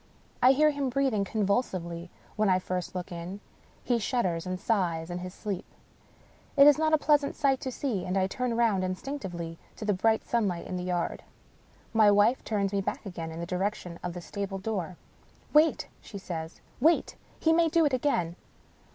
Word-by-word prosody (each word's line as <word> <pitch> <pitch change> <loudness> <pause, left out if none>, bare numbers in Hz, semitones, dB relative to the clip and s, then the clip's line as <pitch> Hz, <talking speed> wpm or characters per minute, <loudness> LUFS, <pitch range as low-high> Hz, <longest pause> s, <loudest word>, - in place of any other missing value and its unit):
I 255 +2 +7
hear 305 +2 +4
him 280 -2 -1
breathing 255 -5 +1
convulsively 185 -5 -1 0.3
when 215 -1 +2
I 185 - +5
first 185 0 -4
look 180 -1 -4
in; 175 +3 -6 0.4
he 240 -2 +1
shudders 190 -7 -1
and 185 0 -3
sighs 175 -7 0
in 175 - -3
his 180 0 -6
sleep. 195 0 -5 0.9
It 280 - +9
is 295 +1 +7
not 315 0 +2
a 310 - +6
pleasant 295 -1 +2
sight 275 -3 +2
to 260 - -4
see, 240 -8 -2
and 185 +2 -1
I 190 - +3
turn 235 +4 -2
round 220 -5 +2
instinctively 185 - -4 0.2
to 215 - -6
the 210 - +2
bright 220 +4 +2
sunlight 200 -8 0
in 185 - -5
the 180 - -3
yard. 175 -2 -1 0.7
My 220 -2 +6
wife 205 +5 +4
turns 200 -2 -1
me 200 - +1
back 195 - -4
again 170 -4 -5
in 160 - -7
the - - -3
direction 180 -1 -3
of 175 - -3
the 175 - -5
stable 200 +2 -4
door. 190 -4 -3 0.3
" - - -29
Wait! 310 +2 +4
" - - -32
she 205 - -9
says. 165 -4 -6
" - - -30
Wait! 325 +4 +3 0.2
he 320 - +3
may 335 0 +4
do 330 0 +4
it 285 - +1
again." 210 - 0
200 Hz, 195 wpm, -28 LUFS, 180-255 Hz, 0.9 s, It